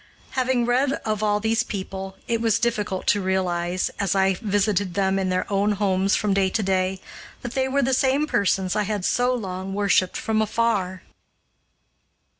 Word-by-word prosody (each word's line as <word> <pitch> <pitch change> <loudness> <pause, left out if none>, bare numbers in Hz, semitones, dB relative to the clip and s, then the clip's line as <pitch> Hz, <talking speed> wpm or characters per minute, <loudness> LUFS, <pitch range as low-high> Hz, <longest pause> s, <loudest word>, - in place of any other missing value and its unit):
Having 255 -2 +1
read 255 +3 +2
of 215 -1 -1
all 210 -1 +2
these 225 +2 +1
people, 190 -1 -6
it 230 -1 0
was 225 -2 +2
difficult 215 -5 -1
to 205 - +2
realize, 185 -1 -1
as 195 -2 0
I 190 0 +3
visited 200 -3 0
them 195 -1 +1
in 190 -1 -1
their 185 0 0
own 200 +2 +2
homes 195 -1 +1
from 210 -2 +1
day 195 -1 +2
to 215 +3 -1
day, 190 0 0 0.4
that 240 0 -5
they 265 -1 +1
were 275 +1 +1
the 265 +2 +1
same 270 +3 +2
persons 195 -7 0
I 210 - +2
had 205 -2 -2
so 245 +1 +2
long 195 -5 -4
worshiped 200 -2 +2
from 220 -1 0
afar! 205 -4 0
200 Hz, 175 wpm, -23 LUFS, 190-230 Hz, 0.4 s, I